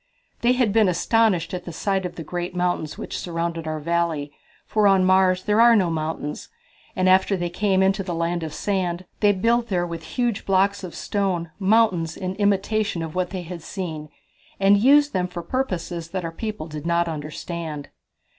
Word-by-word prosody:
"They 240 +1 +4
had 245 -5 +1
been 215 -3 +4
astonished 180 -1 +2
at 180 -1 -4
the 175 - -6
sight 190 +2 -1
of 175 - -12
the 165 - -6
great 175 +3 -4
mountains 175 -3 -1
which - - -5
surrounded 165 -1 -3
our 155 0 -2
valley, 165 -2 -1 0.3
for 215 -1 +2
on 190 -2 +4
Mars 185 0 +3
there 210 +2 +3
are 235 0 +7
no 185 -5 +2
mountains, 155 -2 -4 0.5
and 185 -1 +1
after 190 +1 +4
they 175 -1 -3
came 190 +1 +2
into 195 +1 +2
the 180 -3 -4
Land 170 +1 -1
of 160 -1 -4
Sand 185 0 -2
they 205 -1 +5
built 230 +4 +1
there 180 -4 0
with 170 -1 -6
huge 240 -4 0
blocks 195 +1 +2
of 180 - -7
stone 185 -5 -2
mountains 190 -5 +2
in 185 -1 -3
imitation 205 -2 +1
of 160 -1 -6
what 180 -1 -1
they 185 -2 -5
had 170 0 -7
seen, 160 -4 -6 0.5
and 195 +1 +5
used 290 +5 +5
them 180 -1 0
for 175 -1 -7
purposes 175 -10 -3
that 185 -1 -3
our 165 - -3
people 215 -1 -5
did 155 0 -7
not 170 0 +2
understand." 155 0 -5
180 Hz, 190 wpm, -23 LUFS, 170-200 Hz, 0.5 s, are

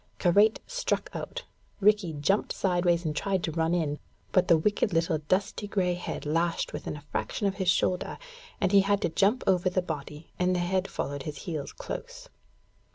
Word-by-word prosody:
Karait 205 +5 +4
struck - - -2
out. - - -5 0.4
Rikki 205 -4 +3
jumped 155 +8 +1
sideways 175 -2 +1
and 155 -1 -1
tried 190 +2 0
to 160 - -1
run 165 +2 +1
in, 150 -4 -1 0.3
but 185 -1 +3
the 170 - +6
wicked 205 +3 +1
little 165 -1 +1
dusty 190 +6 -1
gray 185 -3 +1
head 175 -3 -5
lashed 165 +3 0
within - - -5
a 145 - -12
fraction 205 - -2
of 195 -1 0
his 190 -3 +1
shoulder, 180 0 +1 0.4
and 190 - +1
he 200 - +7
had 200 +1 +2
to - - +2
jump 205 +9 +2
over 185 -1 +3
the 185 0 0
body, 150 -1 -6
and 180 0 +2
the - - +1
head 185 +2 0
followed 140 0 -4
his 145 +1 -6
heels 155 -7 -4
close. - - -7
180 Hz, 185 wpm, -28 LUFS, 160-195 Hz, 0.4 s, he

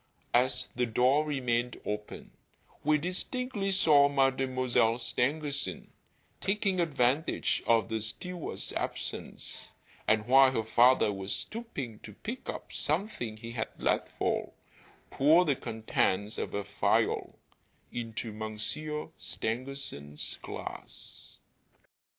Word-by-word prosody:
As 125 +2 +3
the 125 0 +1
door 125 +6 +4
remained 125 -5 0
open, 105 0 -5 0.5
we 150 +1 +4
distinctly 195 - -2
saw 150 -7 +6
Mademoiselle 130 -4 +2
Stangerson, 140 +4 -2 0.5
taking 195 -2 +1
advantage 145 -2 +1
of 115 -1 +4
the 110 -1 -2
steward's 175 - -5
absence, - - -5 0.3
and 105 0 +3
while 135 +2 +7
her 115 - +1
father 115 -1 +5
was 95 0 -3
stooping 145 - -5
to 105 - -10
pick 240 - -6
up - - -6
something 150 - -1
he 115 +1 -7
had 115 -2 -2
let - - +1
fall, - - 0 0.6
pour 160 +6 +5
the 145 -4 +3
contents 110 -3 0
of - - -3
a 100 - -1
phial - - +1 0.5
into 115 -1 -4
Monsieur 110 +9 -4
Stangerson's 95 - -5
glass. - - -8
125 Hz, 110 wpm, -31 LUFS, 110-150 Hz, 0.6 s, while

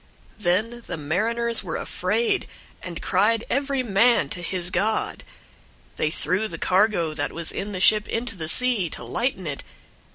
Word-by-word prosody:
001:005 215 - -16
Then 220 +7 0
the - - -3
mariners 230 +10 0
were - - -4
afraid, 440 -4 0 0.3
and 175 -2 -6
cried 215 +4 +2
every 275 -1 +1
man 225 - +3
to 175 - -4
his 175 +1 -2
god. 215 +3 0 0.7
They 155 - +1
threw 185 +6 -1
the - - -7
cargo 185 -4 +2
that - - -2
was 170 -1 -4
in 200 +1 -4
the 185 - -4
ship 210 +2 +5
into 230 -1 -2
the 160 -4 -5
sea, 225 -1 +3
to 125 - -6
lighten 190 - -2
it. 145 -3 -4
205 Hz, 165 wpm, -24 LUFS, 175-235 Hz, 0.7 s, ship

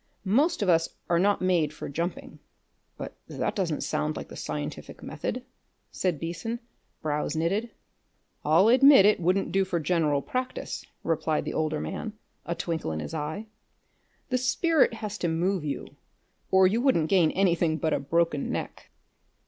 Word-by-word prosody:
Most 275 - +2
of - - -1
us 165 -2 +3 0.2
are 170 - +4
not 200 +1 +2
made 170 -5 +2
for 155 - -7
jumping." 170 +5 -4 0.6
"But - - -7
that - - -2
doesn't - - -1
sound 75 +1 -1
like - - -7
the - - -9
scientific 75 -1 -6
method," - - -4 0.5
said 180 -6 -1
Beason, 175 +8 -4 0.4
brows 150 0 -1
knitted. 195 +9 0 0.7
"I'll 165 +7 +5
admit 260 -2 +8
it 210 - +5
wouldn't 185 +3 +1
do 195 0 +3
for 180 -2 -1
general 155 -4 +1
practice," 255 0 -4 0.2
replied 160 -1 0
the - - -3
older 155 -1 0
man, 215 - -4 0.3
a 170 - -1
twinkle 165 - -3
in 80 - -3
his 75 - -6
eye. 160 +7 -3 0.8
"The 255 -1 +1
spirit 275 +1 +2
has 215 -2 -5
to 175 - 0
move 175 +2 0
you, 145 -2 -5 0.5
or 190 0 +6
you 215 +6 +3
wouldn't 245 - +3
gain 175 -3 +4
anything 170 -4 +2
but 160 -1 0
a - - +1
broken 160 0 0
neck." - - -5
170 Hz, 160 wpm, -27 LUFS, 155-205 Hz, 0.8 s, admit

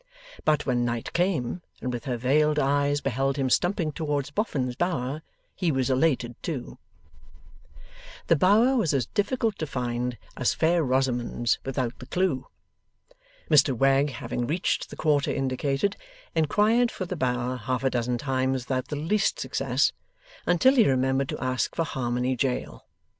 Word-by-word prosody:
But, 150 -1 +2
when 125 -2 +1
night 120 -1 -3
came, 175 -4 0 0.2
and 125 -1 -3
with 120 +3 -5
her 125 -3 -2
veiled 150 +5 +2
eyes 145 0 +2
beheld 135 +1 0
him 135 -2 0
stumping 175 -1 +1
towards 145 -2 -2
Boffin's 140 - -1
Bower, 150 -3 -1 0.3
he 175 -4 0
was 130 -1 0
elated 130 -3 +1
too. 140 -8 -5 1.5
The 165 - +4
Bower 210 - +4
was 185 - +1
as 130 -4 +1
difficult 220 - -1
to 155 - -2
find, 125 -2 -2 0.2
as 125 - +1
Fair 170 +1 +2
Rosamond's 125 -3 0
without 130 -2 -3
the 125 - -10
clue. 180 -6 0 1.0
Mr 145 -4 +5
Wegg, 135 +3 +3
having 120 -1 -4
reached 170 +5 -1
the - - -9
quarter 145 -3 +1
indicated, 135 +7 0 0.4
inquired 215 +9 +3
for 185 - -5
the 185 - -4
Bower 125 -3 -1
half 125 +3 -2
a 135 - +2
dozen 120 0 0
times 130 -1 -1
without 130 -1 -2
the 150 - -4
least 175 +8 0
success, - - +1 0.6
until 260 +11 +4
he 225 - +6
remembered 130 +1 +1
to - - -4
ask 130 0 -1
for 165 - +1
Harmony 125 -1 -1
Jail. 125 - -3
135 Hz, 155 wpm, -26 LUFS, 125-160 Hz, 1.5 s, he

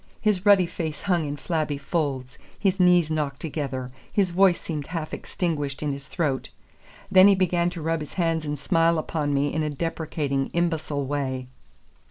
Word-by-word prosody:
His 205 -2 +1
ruddy 200 -3 +7
face 160 -3 -5
hung 175 -6 +1
in 145 +1 -4
flabby 155 -1 -1
folds, 140 -4 -2 0.2
his 195 -2 +1
knees 180 -3 +5
knocked 145 -3 -1
together, 135 -5 -4 0.2
his 195 -3 +2
voice 185 0 +4
seemed 150 -4 -5
half 165 -2 -4
extinguished 145 -5 -3
in 150 - 0
his 140 +1 -8
throat. 150 -7 -1 0.6
Then 190 0 +8
he 200 - +6
began 175 -2 +2
to 175 -3 -7
rub 165 0 0
his 150 - -8
hands 165 -3 0
and 150 -1 -3
smile 165 +2 +2
upon 155 -2 -1
me 140 0 +1
in 155 - 0
a 155 - 0
deprecating, 145 -3 -2
imbecile 160 -4 0
way. 130 -2 -3
155 Hz, 175 wpm, -25 LUFS, 145-175 Hz, 0.6 s, Then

